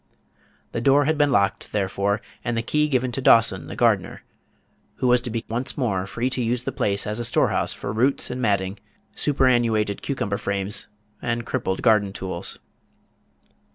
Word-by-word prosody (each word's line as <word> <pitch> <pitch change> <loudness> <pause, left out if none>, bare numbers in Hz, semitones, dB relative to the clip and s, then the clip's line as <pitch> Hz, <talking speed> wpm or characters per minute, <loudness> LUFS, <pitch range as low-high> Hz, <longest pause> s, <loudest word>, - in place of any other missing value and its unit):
The 115 - -3
door 140 +3 +4
had 155 +2 +2
been 145 -1 +2
locked, 100 -5 +1
therefore, 100 +1 0 0.2
and 120 -1 -1
the 115 - -1
key 150 +5 +1
given 130 -2 +1
to 135 - -3
Dawson, 105 -9 +4
the - - -7
gardener, - - +1 0.7
who - - -3
was 125 -1 +4
to 125 - -5
be 115 0 -4
once 120 +4 -3
more 100 -8 -1
free 115 +5 -2
to 125 - -1
use 120 +1 -1
the - - -3
place 100 -1 -1
as 105 +2 -3
a - - -1
storehouse 115 - +1
for 100 - -5
roots 125 +4 +1
and 125 +1 -4
matting, 100 -3 0 0.4
superannuated 120 -7 +2
cucumber 100 -8 -2
frames, 100 0 -3 0.3
and 120 -1 -2
crippled 95 -3 -2
garden 105 -4 +3
tools. 95 -3 -4
115 Hz, 170 wpm, -23 LUFS, 100-125 Hz, 0.7 s, door